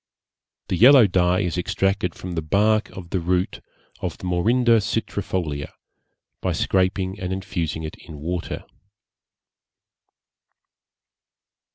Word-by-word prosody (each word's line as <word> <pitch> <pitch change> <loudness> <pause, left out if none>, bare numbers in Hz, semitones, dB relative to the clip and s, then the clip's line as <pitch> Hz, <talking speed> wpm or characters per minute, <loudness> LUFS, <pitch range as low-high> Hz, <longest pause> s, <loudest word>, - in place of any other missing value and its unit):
The 90 - 0
yellow 130 +4 +8
dye 90 -1 +2
is 90 -2 -1
extracted 95 -1 0
from 90 - -7
the 80 - -1
bark 105 +7 +2
of 90 -3 -10
the 95 - +1
root 90 +2 -1 0.4
of - - -4
the - - -17
Morinda 115 +6 +3
citrifolia, 95 -8 -3 0.7
by - - 0
scraping 95 +1 0
and 95 -2 -3
infusing 85 -4 -3
it 80 - -6
in 80 -3 -9
water. 85 +3 -4
95 Hz, 110 wpm, -23 LUFS, 85-100 Hz, 0.7 s, yellow